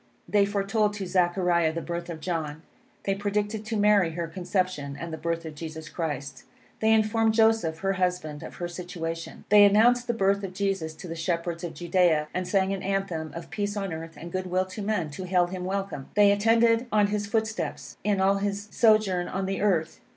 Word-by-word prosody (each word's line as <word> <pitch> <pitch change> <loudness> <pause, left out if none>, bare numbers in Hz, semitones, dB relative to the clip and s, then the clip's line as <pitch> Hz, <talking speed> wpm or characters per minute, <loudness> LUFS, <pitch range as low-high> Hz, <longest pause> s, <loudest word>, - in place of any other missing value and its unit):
They 200 +2 +3
foretold 205 +1 0
to 200 -2 -4
Zechariah 175 -2 +2
the 165 - -2
birth 170 0 -4
of 160 -2 -6
John. 160 -3 -3 0.4
They 195 - +1
predicted 205 +2 -2
to 220 0 -2
Mary 205 -5 +4
her 170 0 -3
conception, 175 -5 -2
and 170 -1 -6
the - - -3
birth 165 0 -2
of 160 - -6
Jesus 160 0 -7
Christ. 145 -5 -4 0.4
They 220 0 +3
informed 220 0 +3
Joseph, 220 -8 +3
her 195 0 +1
husband, 180 -5 -1
of - - -9
her 175 - -4
situation. 170 -2 -6
They 210 0 +8
announced 235 +5 +5
the 235 - 0
birth 200 -1 +2
of 185 -1 -6
Jesus 190 -5 -1
to 180 - -9
the 165 - -4
shepherds 170 0 -2
of 175 - -5
Judea, 175 -4 +2
and 185 0 -2
sang 190 0 +2
an 195 - -4
anthem 195 -5 -2
of 170 +1 -8
peace 205 +1 -2
on 195 -4 -2
earth 160 -1 -7
and 170 +3 -8
good 185 +1 -3
will 185 +1 +1
to 190 +3 -7
man, 200 -7 -1
to 185 +6 -6
hail 180 -1 +3
him 180 0 -5
welcome. 195 -7 -3
They 205 -1 +6
attended 230 +3 +3
on 210 -1 +4
his 205 -1 -1
footsteps, 220 +1 -3
in 205 -1 +1
all 195 +1 +3
his 200 +1 -3
sojourn 215 -6 +3
on 190 +1 -2
the 195 0 -2
earth. 180 -6 +1
185 Hz, 200 wpm, -27 LUFS, 170-205 Hz, 0.4 s, They